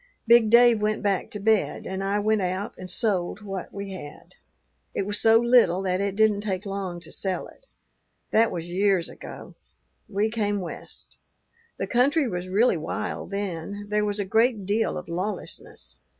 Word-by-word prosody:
"Big 235 Hz, -1 st, +6 dB
Dave 235 Hz, -1 st, +6 dB
went 215 Hz, 0 st, 0 dB
back 200 Hz, -3 st, 0 dB
to 210 Hz, -, -5 dB
bed, 215 Hz, 0 st, +1 dB
and 190 Hz, +1 st, -4 dB
I 200 Hz, +1 st, 0 dB
went 215 Hz, 0 st, +1 dB
out 185 Hz, +3 st, -2 dB
and 185 Hz, 0 st, -9 dB
sold 200 Hz, -2 st, 0 dB
what 195 Hz, -3 st, -6 dB
we 200 Hz, -1 st, -6 dB
had. 150 Hz, -6 st, -10 dB, 0.6 s
It 195 Hz, -, -1 dB
was 205 Hz, +1 st, -2 dB
so 225 Hz, 0 st, +6 dB
little 235 Hz, -7 st, +4 dB
that 185 Hz, 0 st, 0 dB
it 200 Hz, -1 st, -1 dB
didn't 215 Hz, -1 st, +3 dB
take 200 Hz, -1 st, -3 dB
long 195 Hz, -3 st, -4 dB
to -, -, -9 dB
sell 190 Hz, -2 st, +1 dB
it. -, -, -17 dB, 0.6 s
That 225 Hz, +1 st, +4 dB
was 170 Hz, -1 st, -5 dB
years 185 Hz, -1 st, +1 dB
ago. -, -, -10 dB, 0.6 s
We 210 Hz, +2 st, 0 dB
came 205 Hz, -2 st, 0 dB
West. 180 Hz, -3 st, -8 dB, 0.6 s
The -, -, -2 dB
country 275 Hz, +4 st, +2 dB
was 180 Hz, -3 st, -4 dB
really 205 Hz, 0 st, +3 dB
wild 160 Hz, -, -4 dB
then; 200 Hz, 0 st, -4 dB
there 210 Hz, 0 st, +1 dB
was 205 Hz, 0 st, -1 dB
a 200 Hz, -, -1 dB
great 220 Hz, +1 st, +2 dB
deal 215 Hz, +3 st, 0 dB
of 180 Hz, -, -7 dB
lawlessness. 185 Hz, +5 st, -5 dB
200 Hz, 175 wpm, -25 LUFS, 185-220 Hz, 0.6 s, Big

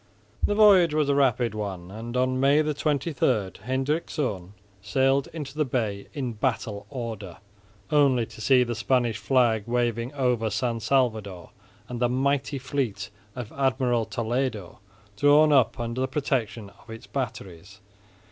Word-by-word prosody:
The 205 Hz, -, +2 dB
voyage 190 Hz, -7 st, +6 dB
was 150 Hz, -2 st, +1 dB
a -, -, +4 dB
rapid 125 Hz, -5 st, +2 dB
one 95 Hz, -4 st, -5 dB
and 115 Hz, +4 st, -6 dB
on 130 Hz, 0 st, +1 dB
May 140 Hz, +3 st, +4 dB
23, 150 Hz, +1 st, -1 dB, 0.5 s
Hendrikszoon 130 Hz, -, -2 dB, 0.3 s
sailed 135 Hz, +6 st, +1 dB
into 150 Hz, -3 st, -7 dB
the 155 Hz, -, +1 dB
bay 110 Hz, -7 st, -2 dB
in 130 Hz, -6 st, -4 dB
battle 110 Hz, -3 st, -2 dB
order, 110 Hz, -9 st, -6 dB, 0.5 s
only 135 Hz, -5 st, +3 dB
to 110 Hz, -, -13 dB
see 130 Hz, +2 st, +4 dB
the 120 Hz, -1 st, -3 dB
Spanish 120 Hz, -1 st, 0 dB
flag 115 Hz, -3 st, +2 dB
waving 120 Hz, 0 st, -1 dB
over 125 Hz, -5 st, +1 dB
San 120 Hz, 0 st, -1 dB
Salvador 110 Hz, -7 st, -1 dB, 0.4 s
and 125 Hz, -1 st, -6 dB
the 120 Hz, 0 st, +2 dB
mighty 140 Hz, +2 st, 0 dB
fleet 125 Hz, -7 st, -3 dB, 0.2 s
of 120 Hz, -3 st, -6 dB
Admiral 130 Hz, -4 st, +1 dB
Toledo 115 Hz, -5 st, -3 dB, 0.4 s
drawn 150 Hz, +1 st, +5 dB
up 130 Hz, -1 st, +3 dB
under 120 Hz, +2 st, -3 dB
the 130 Hz, -, +1 dB
protection 120 Hz, -7 st, -2 dB
of -, -, -22 dB
its 115 Hz, 0 st, -9 dB
batteries. 100 Hz, -7 st, -6 dB
125 Hz, 140 wpm, -26 LUFS, 110-135 Hz, 0.5 s, voyage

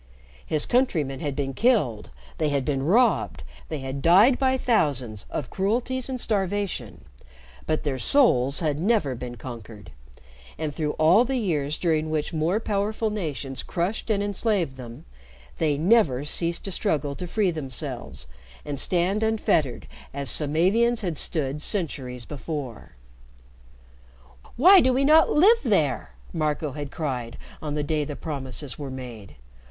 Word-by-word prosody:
His 155 Hz, -1 st, -1 dB
countrymen 165 Hz, -, +1 dB
had 145 Hz, -2 st, -3 dB
been 135 Hz, -1 st, -2 dB
killed, 145 Hz, -, +1 dB, 0.3 s
they 155 Hz, -, +1 dB
had 140 Hz, -2 st, -1 dB
been 140 Hz, -3 st, 0 dB
robbed, 165 Hz, -, +2 dB, 0.3 s
they 155 Hz, -, -3 dB
had 135 Hz, +1 st, -5 dB
died 200 Hz, -, +5 dB
by 260 Hz, -1 st, +2 dB
thousands 135 Hz, -, 0 dB
of 135 Hz, -, -5 dB
cruelties 240 Hz, +6 st, -1 dB
and 255 Hz, -1 st, -3 dB
starvation, 205 Hz, -3 st, -2 dB, 0.6 s
but 155 Hz, -, 0 dB
their 140 Hz, -4 st, -2 dB
souls 140 Hz, -, +3 dB
had 150 Hz, -3 st, 0 dB
never 190 Hz, -, +1 dB
been 120 Hz, 0 st, -7 dB
conquered, 110 Hz, -, -10 dB, 0.7 s
and, 155 Hz, -2 st, -3 dB
through 150 Hz, 0 st, -2 dB
all 170 Hz, +9 st, +5 dB
the 260 Hz, +1 st, -1 dB
years 155 Hz, -, -1 dB
during 160 Hz, -3 st, 0 dB
which 155 Hz, 0 st, -2 dB
more 165 Hz, +6 st, +1 dB
powerful 215 Hz, +1 st, -1 dB
nations 140 Hz, -, -4 dB
crushed 180 Hz, +7 st, -3 dB
and 200 Hz, -2 st, +1 dB
enslaved 200 Hz, -, 0 dB
them, 120 Hz, -2 st, -10 dB, 0.5 s
they 150 Hz, -3 st, +1 dB
never 160 Hz, -, +3 dB
ceased 170 Hz, +3 st, -1 dB
to 195 Hz, -, -3 dB
struggle 145 Hz, -4 st, 0 dB
to 180 Hz, +5 st, -6 dB
free 195 Hz, +1 st, +1 dB
themselves 135 Hz, -, -6 dB, 0.4 s
and 145 Hz, -2 st, -4 dB
stand 185 Hz, +6 st, 0 dB
unfettered 205 Hz, -, 0 dB, 0.3 s
as 140 Hz, -1 st, +3 dB
Samavians 190 Hz, +11 st, +2 dB
had 175 Hz, -5 st, -2 dB
stood 150 Hz, -1 st, -1 dB
centuries 130 Hz, -, -3 dB
before. 145 Hz, -5 st, -6 dB, 1.6 s
"Why 370 Hz, +9 st, +8 dB
do 255 Hz, -, +3 dB
we 270 Hz, +2 st, +2 dB
not 315 Hz, +2 st, +6 dB
live 415 Hz, +10 st, +5 dB
there," -, -, 0 dB, 0.2 s
Marco 155 Hz, -2 st, -1 dB
had 145 Hz, +1 st, -6 dB
cried 125 Hz, -7 st, -4 dB, 0.2 s
on 150 Hz, -1 st, -4 dB
the 150 Hz, -, -1 dB
day 150 Hz, 0 st, 0 dB
the 145 Hz, 0 st, -6 dB
promises 140 Hz, -2 st, -6 dB
were 140 Hz, -2 st, -5 dB
made. 120 Hz, -6 st, -9 dB
155 Hz, 145 wpm, -25 LUFS, 135-205 Hz, 1.6 s, Why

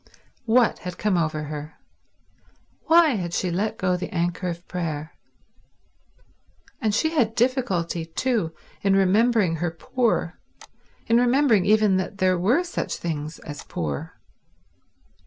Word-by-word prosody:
What 235 Hz, +1 st, +3 dB
had 180 Hz, -1 st, -7 dB
come 210 Hz, -3 st, +1 dB
over 155 Hz, -3 st, 0 dB
her? 150 Hz, +1 st, -7 dB, 1.1 s
Why 330 Hz, 0 st, +6 dB
had 180 Hz, -, -2 dB
she 180 Hz, -, -1 dB
let 200 Hz, +5 st, -1 dB
go 185 Hz, -1 st, +1 dB
the 180 Hz, -, -4 dB
anchor 175 Hz, +1 st, -1 dB
of 170 Hz, 0 st, -6 dB
prayer? 160 Hz, -3 st, -4 dB, 1.7 s
And 215 Hz, -3 st, +1 dB
she 315 Hz, +8 st, +1 dB
had 235 Hz, -9 st, +1 dB
difficulty, 195 Hz, -10 st, 0 dB
too, 215 Hz, -1 st, -1 dB, 0.3 s
in 195 Hz, -1 st, +3 dB
remembering 195 Hz, -2 st, +3 dB
her 175 Hz, +2 st, -1 dB
poor, 230 Hz, +9 st, -1 dB, 0.7 s
in 230 Hz, -, +3 dB
remembering 245 Hz, -5 st, +3 dB
even 215 Hz, -2 st, +4 dB
that 190 Hz, +2 st, -3 dB
there 185 Hz, -2 st, +2 dB
were 240 Hz, -, +2 dB
such 355 Hz, -, -3 dB
things 155 Hz, -2 st, -4 dB
as 145 Hz, -2 st, -8 dB
poor. 75 Hz, -4 st, -5 dB
185 Hz, 130 wpm, -24 LUFS, 170-230 Hz, 1.7 s, Why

